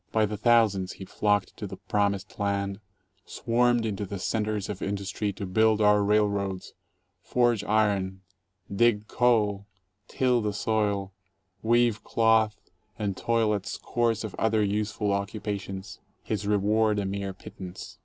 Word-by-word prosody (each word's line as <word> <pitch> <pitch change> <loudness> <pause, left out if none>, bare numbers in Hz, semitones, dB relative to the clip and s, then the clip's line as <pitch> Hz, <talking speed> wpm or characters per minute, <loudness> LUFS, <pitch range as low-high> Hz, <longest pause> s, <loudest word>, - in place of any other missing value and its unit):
By 110 -1 +3
the 105 0 -4
thousands 105 -4 +3
he 95 - -9
flocked 105 0 0
to - - -5
the - - -8
promised 100 -1 -1
land, 100 -1 -1 0.4
swarmed 120 0 +1
into 105 -2 -2
the 100 0 -5
centers 105 0 -1
of 105 - -6
industry 100 +1 -2
to 100 +1 -6
build 110 +3 +3
our 105 -1 +4
railroads, 100 -2 0 0.5
forge 120 -3 +1
iron, 100 -3 +1 0.5
dig 110 -1 +3
coal, 105 -5 +2 0.4
till 125 -2 +1
the 105 -1 -1
soil, 100 -2 -1 0.5
weave 120 -1 +2
cloth, 110 -1 +2 0.4
and 100 -3 -2
toil 115 -1 +1
at 100 -2 -3
scores 115 -2 -1
of 110 - -5
other 110 -1 +2
useful 105 0 -1
oc 100 0 -1
cupations, 100 -2 -6 0.2
his 105 -1 -3
reward 105 +1 +2
a 100 - -1
mere 100 0 -3
pittance. 95 -1 -10
105 Hz, 140 wpm, -27 LUFS, 100-110 Hz, 0.5 s, our